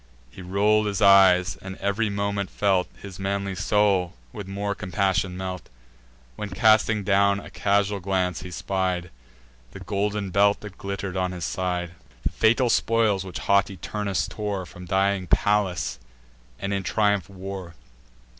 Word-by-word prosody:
He 85 - -11
roll'd 105 +4 +2
his 100 -2 -2
eyes, 95 -3 +6
and 95 0 -7
ev'ry 100 +3 0
moment 100 -1 -2
felt 95 -3 +1
His 95 -2 -9
manly 100 0 -2
soul 95 -3 +1 0.2
with 100 -2 -7
more 100 +1 -2
compassion 95 -2 -1
melt; 95 -1 -5 0.7
When, 105 - -5
casting 110 +1 +3
down 100 +1 +3
a - - -11
casual 100 0 +1
glance, 90 -2 -1
he 90 - -8
spied 90 -1 -2 0.6
The - - -8
golden 100 +1 -2
belt 100 +2 +3
that 100 -3 -10
glitter'd 100 -1 -4
on 95 -1 -1
his 90 -3 -4
side, 90 -2 -2 0.3
The - - +1
fatal 120 +2 +3
spoils 110 -4 +2
which 95 -2 -7
haughty 100 -1 +1
Turnus 100 +2 -2
tore 100 -3 -4
From 90 +1 -11
dying 95 0 +1
Pallas, 95 -14 +1 0.6
and 100 +5 -3
in 100 - 0
triumph 105 -1 +1
wore. 95 -3 -7
100 Hz, 145 wpm, -25 LUFS, 95-100 Hz, 0.7 s, eyes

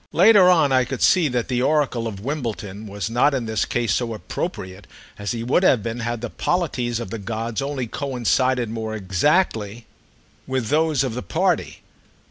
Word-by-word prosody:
Later 190 +1 +6
on 160 -6 +4
I 130 -1 +4
could 130 +1 -3
see 180 -4 +4
that 125 -3 -1
the 125 -1 0
oracle 135 -5 +1
of 100 -3 -6
Wimbledon 110 -7 -4
was 100 -2 -4
not 125 +5 +2
in 125 -3 -2
this 110 -1 -1
case 120 -2 0
so 115 -2 -1
appropriate 95 -2 -6 0.3
as 105 -1 -3
he 115 -1 -3
would 125 +9 +2
have 130 - +3
been 115 +1 -4
had 120 -1 -3
the 120 - -4
polities 125 -10 -1
of 115 -5 -6
the 115 - -4
gods 110 +2 -3
only 135 -2 -3
coincided 125 -1 0
more 110 -1 -4
exactly 110 - 0 0.6
with 130 -4 -2
those 155 -2 +2
of 130 -4 -2
the 125 - -4
party. 90 - -1
120 Hz, 180 wpm, -22 LUFS, 110-140 Hz, 0.6 s, Later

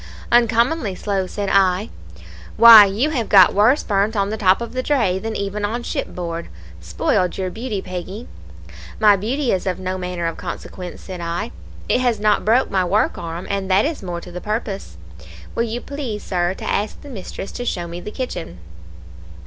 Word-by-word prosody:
"'Uncommonly 235 - +2
slow,' 195 -1 -2
said 205 +1 -4
I. 190 +1 +2 0.7
"'Why, 230 -3 +11
you 220 +10 0
have 240 -7 -2
got 190 -3 +7
worse 220 +9 +4
burnt 205 +1 0
on 200 0 0
the - - -1
top 195 -3 +3
of 235 0 -6
the 255 - -1
dray 235 -10 +1
than 220 +2 -4
even 200 +1 -3
on 230 +4 -2
shipboard. 170 -5 -4 0.3
Spoiled 85 - 0
your 185 -1 -2
beauty, 220 -3 -4
Peggy.' 185 +5 -7 0.7
"'My 210 -1 +6
beauty 240 +7 -1
is 190 0 -1
of 185 - -1
no 185 0 -4
manner 180 -1 -4
of 165 - -2
consequence,' 180 0 -7
said 185 -2 -8
I, 170 - -3 0.4
'it 250 - +2
has 240 -4 +1
not 210 0 +2
broke 235 +5 +2
my 190 -2 +2
work 195 +4 +1
arm, 170 +1 -6
and 195 -1 -3
that 190 +3 +4
is 310 0 -3
more 175 -3 -5
to 180 - -11
the 180 +1 -7
purpose. 210 - -4 0.6
Will - - -1
you 230 +1 -4
please, 255 -7 -5
Sir, 180 0 -1
to - - -8
ask 210 +1 -2
the - - -12
mistress 195 -5 -7
to 245 - -5
show 180 -7 -2
me 170 +1 -7
the 210 - -6
kitchen?' 90 - -5
200 Hz, 190 wpm, -20 LUFS, 180-230 Hz, 0.7 s, Why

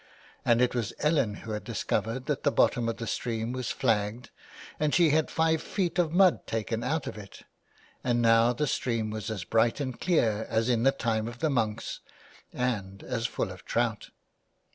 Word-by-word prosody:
And 120 0 +3
it 125 - +1
was 120 -5 -2
Ellen 150 -9 +2
who 110 - -5
had 105 0 -3
discovered 125 +4 -2
that 150 - -1
the 145 - +2
bottom 120 -4 +2
of 115 - -3
the 115 - -5
stream 115 0 -2
was 130 -2 -3
flagged 110 -1 0 0.5
and 150 -1 +1
she 170 -4 +5
had 155 +1 +2
five 160 -1 +1
feet 180 -3 -2
of 165 -3 +2
mud 185 +1 +4
taken 115 +1 -2
out 155 +3 -1
of - - -6
it, 100 -2 -12 0.6
and 120 -1 +1
now 115 0 +5
the 135 +5 -1
stream 115 -5 -1
was 110 +1 -4
as 105 -5 -3
bright 115 - +2
and 130 -4 -4
clear 110 - +1
as 115 +2 +1
in 120 -2 +2
the 135 +3 +5
time 110 -3 -1
of 120 0 -7
the 155 +3 0
monks, 110 -5 -1 0.5
and 100 -6 -3
as 120 -2 -2
full - - -3
of - - -11
trout. - - -1
120 Hz, 190 wpm, -28 LUFS, 110-140 Hz, 0.6 s, she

